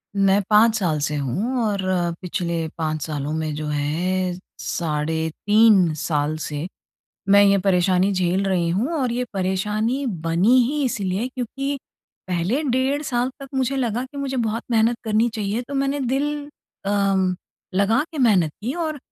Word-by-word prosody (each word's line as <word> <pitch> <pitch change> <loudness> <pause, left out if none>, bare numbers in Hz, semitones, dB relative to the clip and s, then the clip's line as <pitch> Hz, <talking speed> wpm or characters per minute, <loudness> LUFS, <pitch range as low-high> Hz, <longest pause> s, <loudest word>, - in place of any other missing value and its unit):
मैं 195 0 +4
5 220 +1 +5
साल 160 -5 0
से 150 +1 -1
हूँ 185 - -1
और 205 -2 0 0.4
पिछले 170 -2 -2
5 155 -2 -2
सालों 150 -1 -3
में 155 -1 -2
जो 155 0 -4
है 175 +5 -1 0.3
साढ़े 160 0 -1 0.2
3 205 -6 +5
साल 150 0 -1
से, 150 +2 -4 0.6
मैं 200 +1 +7
ये 200 0 +5
परेशानी 185 +1 +3
झेल 185 +1 +1
रही 180 -3 +1
हूँ। 230 - 0
और 250 -2 0
ये 250 +1 -1
परेशानी 210 +7 -1
बनी 175 +4 +2
ही 295 0 -1
इसलिए 200 -1 -1
क्योंकि 275 +3 -4 0.5
पहले 185 - 0
डेढ़ 270 +2 0
साल 250 -2 -1
तक 275 - -8
मुझे 265 +1 0
लगा 245 -1 -1
कि 275 +2 -13
मुझे 270 -1 -2
बहुत 230 -1 -1
मेहनत 230 +1 +3
करनी 220 +2 +2
चाहिए। 215 +2 -2
तो 285 - -5
मैंने 275 +1 0
दिल 275 +3 0 0.5
अम, 195 -2 +2 0.4
लगा 215 +7 +3
के 305 - -6
मेहनत 195 - +4
की 250 +5 -2
और 315 -4 -2
200 Hz, 155 wpm, -22 LUFS, 170-245 Hz, 0.6 s, मैं